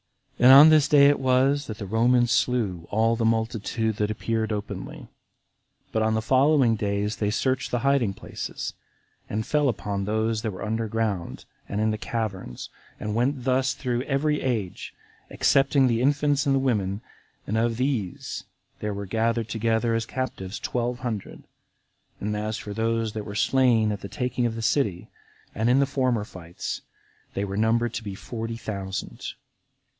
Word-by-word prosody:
36. -, -, -1 dB
And 135 Hz, +1 st, +11 dB
on 155 Hz, +2 st, +9 dB
this 155 Hz, -2 st, +5 dB
day 145 Hz, -2 st, +6 dB
it 145 Hz, -, +2 dB
was 135 Hz, +2 st, +2 dB
that 110 Hz, -, -6 dB
the 105 Hz, -, -6 dB
Romans 120 Hz, +4 st, +3 dB
slew 100 Hz, -9 st, 0 dB
all 115 Hz, +2 st, +2 dB
the 115 Hz, -, -2 dB
multitude 110 Hz, -1 st, 0 dB
that 105 Hz, 0 st, 0 dB
appeared 110 Hz, +1 st, -1 dB
openly; 105 Hz, -1 st, -5 dB, 0.8 s
but 110 Hz, -, 0 dB
on 110 Hz, 0 st, +2 dB
the 110 Hz, -, -1 dB
following 130 Hz, -2 st, +4 dB
days 105 Hz, 0 st, -1 dB
they 105 Hz, -, 0 dB
searched 130 Hz, +4 st, 0 dB
the 120 Hz, -, 0 dB
hiding 130 Hz, -8 st, +2 dB
places, -, -, -6 dB, 0.6 s
and 110 Hz, +1 st, -2 dB
fell 145 Hz, +1 st, +2 dB
upon 100 Hz, -3 st, -2 dB
those 110 Hz, +1 st, 0 dB
that 110 Hz, -, -2 dB
were 95 Hz, -1 st, -6 dB
under 110 Hz, +1 st, -1 dB
ground, 105 Hz, -5 st, -2 dB, 0.2 s
and 100 Hz, -, -2 dB
in 110 Hz, 0 st, +2 dB
the 110 Hz, -, -3 dB
caverns, 100 Hz, -, -4 dB, 0.3 s
and 105 Hz, -, -3 dB
went 125 Hz, +3 st, 0 dB
thus 130 Hz, +1 st, +1 dB
through 125 Hz, -2 st, -2 dB
every 150 Hz, +2 st, 0 dB
age, 110 Hz, -8 st, -3 dB, 0.3 s
excepting 135 Hz, 0 st, +3 dB
the 120 Hz, -2 st, +1 dB
infants 145 Hz, +1 st, +2 dB
and 135 Hz, -, +3 dB
the -, -, +3 dB
women, 105 Hz, -6 st, 0 dB, 0.4 s
and 105 Hz, -, -2 dB
of 115 Hz, 0 st, +1 dB
these 125 Hz, -8 st, -2 dB, 0.3 s
there 105 Hz, -1 st, -3 dB
were 100 Hz, 0 st, -5 dB
gathered 115 Hz, +2 st, 0 dB
together 115 Hz, +1 st, +1 dB
as 115 Hz, 0 st, -1 dB
captives 110 Hz, -6 st, -4 dB
twelve 120 Hz, 0 st, -2 dB
hundred; 115 Hz, -6 st, -5 dB, 0.8 s
and 105 Hz, +1 st, -2 dB
as 105 Hz, +1 st, -2 dB
for 105 Hz, -, -6 dB
those 115 Hz, 0 st, -1 dB
that 110 Hz, -2 st, -5 dB
were 100 Hz, -, -7 dB
slain 115 Hz, -2 st, +3 dB
at 100 Hz, -, -4 dB
the 100 Hz, -, -7 dB
taking 125 Hz, -1 st, -1 dB
of 115 Hz, -, -4 dB
the 115 Hz, -, -5 dB
city, 105 Hz, -9 st, 0 dB, 0.4 s
and 110 Hz, +3 st, 0 dB
in 130 Hz, +2 st, +5 dB
the 140 Hz, -, +4 dB
former 130 Hz, -5 st, 0 dB
fights, 90 Hz, -4 st, -6 dB, 0.5 s
they 100 Hz, -, -1 dB
were 100 Hz, 0 st, -5 dB
numbered 115 Hz, +2 st, +1 dB
to 115 Hz, -, -4 dB
be 100 Hz, -2 st, -5 dB
forty 115 Hz, +2 st, -5 dB
thousand. 100 Hz, -4 st, -5 dB
115 Hz, 175 wpm, -25 LUFS, 105-130 Hz, 0.8 s, And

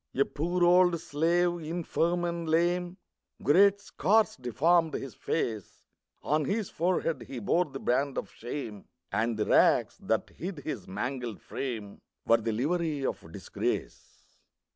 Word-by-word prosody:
A 140 Hz, -, +3 dB
poor 175 Hz, +4 st, -1 dB
old 175 Hz, -1 st, +5 dB
slave, 175 Hz, +4 st, +1 dB
infirm 170 Hz, +1 st, -1 dB
and 170 Hz, -1 st, -3 dB
lame; 175 Hz, +2 st, +1 dB, 0.5 s
Great 200 Hz, +6 st, +5 dB
scars 205 Hz, +3 st, +2 dB
deformed 160 Hz, +6 st, +2 dB
his 135 Hz, -4 st, -5 dB
face; 110 Hz, -, -3 dB, 0.4 s
On 155 Hz, +1 st, +1 dB
his 205 Hz, +5 st, -2 dB
forehead 170 Hz, -1 st, 0 dB
he 135 Hz, -, -7 dB
bore 165 Hz, -, +2 dB
the 135 Hz, -3 st, -8 dB
brand 135 Hz, +2 st, 0 dB
of -, -, -4 dB
shame, 115 Hz, -4 st, -6 dB, 0.3 s
And 115 Hz, 0 st, 0 dB
the 105 Hz, -, 0 dB
rags, -, -, +3 dB
that -, -, -1 dB
hid 180 Hz, 0 st, -6 dB
his 105 Hz, -7 st, -5 dB
mangled 120 Hz, +2 st, -4 dB
frame, 110 Hz, -7 st, -6 dB, 0.2 s
Were 115 Hz, -, +5 dB
the 115 Hz, 0 st, -2 dB
livery 150 Hz, +4 st, -1 dB
of 80 Hz, -, -4 dB
disgrace. -, -, -5 dB
155 Hz, 140 wpm, -29 LUFS, 125-175 Hz, 0.5 s, old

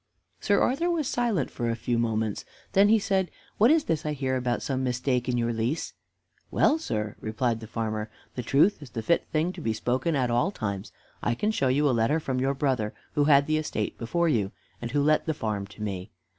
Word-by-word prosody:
Sir 205 Hz, -1 st, +2 dB
Arthur 330 Hz, +7 st, +2 dB
was 325 Hz, -5 st, 0 dB
silent 230 Hz, -, 0 dB
for 120 Hz, -1 st, -2 dB
a 115 Hz, -, 0 dB
few 120 Hz, +1 st, -1 dB
moments. 110 Hz, -2 st, -1 dB, 0.3 s
Then 200 Hz, +1 st, +5 dB
he 225 Hz, -, +6 dB
said, 195 Hz, -3 st, 0 dB, 0.3 s
"What 225 Hz, +4 st, +6 dB
is 315 Hz, 0 st, +4 dB
this 160 Hz, -2 st, -1 dB
I 150 Hz, -, -1 dB
hear 130 Hz, -2 st, -1 dB
about 125 Hz, -1 st, -1 dB
some 130 Hz, -1 st, -1 dB
mistake 125 Hz, 0 st, 0 dB
in 125 Hz, -, +1 dB
your 120 Hz, 0 st, 0 dB
lease?" 115 Hz, +8 st, -2 dB, 0.6 s
"Well, 310 Hz, -, +3 dB
sir," 105 Hz, -, -3 dB
replied 115 Hz, +1 st, -1 dB
the 110 Hz, -, -9 dB
farmer, 110 Hz, -1 st, -3 dB, 0.2 s
"the 125 Hz, -, -3 dB
truth 150 Hz, -, +3 dB
is 145 Hz, -, -10 dB
the 115 Hz, 0 st, -5 dB
fit 170 Hz, -, +2 dB
thing 160 Hz, +4 st, 0 dB
to 180 Hz, -, -8 dB
be 115 Hz, -6 st, 0 dB
spoken 130 Hz, +8 st, 0 dB
at 125 Hz, -3 st, +1 dB
all 120 Hz, +10 st, +2 dB
times. 100 Hz, -, -4 dB, 0.3 s
I 120 Hz, -, 0 dB
can 210 Hz, -, 0 dB
show 140 Hz, -11 st, +1 dB
you 140 Hz, +3 st, +3 dB
a -, -, +3 dB
letter 115 Hz, +7 st, +2 dB
from 130 Hz, -4 st, -2 dB
your 135 Hz, +2 st, +1 dB
brother 130 Hz, -6 st, 0 dB, 0.2 s
who 145 Hz, -1 st, +2 dB
had 140 Hz, -1 st, +6 dB
the 155 Hz, +1 st, +1 dB
estate 130 Hz, -9 st, -3 dB
before 170 Hz, +9 st, 0 dB
you, 105 Hz, -10 st, +1 dB, 0.3 s
and 120 Hz, -, -3 dB
who 145 Hz, +3 st, +1 dB
let 155 Hz, +2 st, +3 dB
the 160 Hz, -, 0 dB
farm 105 Hz, -5 st, -2 dB
to 105 Hz, +1 st, -9 dB
me. 95 Hz, -1 st, -4 dB
130 Hz, 225 wpm, -27 LUFS, 115-160 Hz, 0.6 s, he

